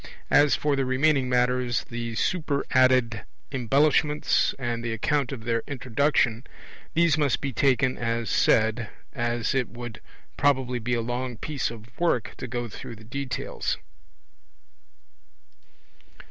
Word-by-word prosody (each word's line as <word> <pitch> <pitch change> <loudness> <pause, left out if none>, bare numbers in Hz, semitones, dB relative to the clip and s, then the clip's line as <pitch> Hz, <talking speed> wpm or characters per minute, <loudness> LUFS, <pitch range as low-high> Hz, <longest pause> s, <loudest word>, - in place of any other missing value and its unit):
As 145 0 +5
for 145 -1 +1
the 135 - +1
remaining 130 +1 +2
matters, 125 0 +1
the 115 -1 -5
superadded 130 - +2 0.3
embellishments 145 +3 +2
and 120 -3 -3
the 120 -1 -2
account 140 +4 0
of 125 -5 -6
their 115 0 0
introduction, 125 -2 +1 0.5
these 165 -2 +4
must 145 -4 +2
be 135 -2 -3
taken 130 0 +2
as 115 -1 -1
said, 110 0 +2 0.2
as 120 0 -1
it 130 -3 0
would 120 -2 -8 0.4
probably 130 -3 +2
be 120 +2 -1
a 115 - 0
long 120 +1 -3
piece 145 +2 -2
of 115 +2 -12
work 165 -10 +1
to - - -6
go 120 0 -3
through 115 +1 -8
the 110 - -14
details. 130 +2 -3
125 Hz, 130 wpm, -26 LUFS, 115-140 Hz, 0.5 s, As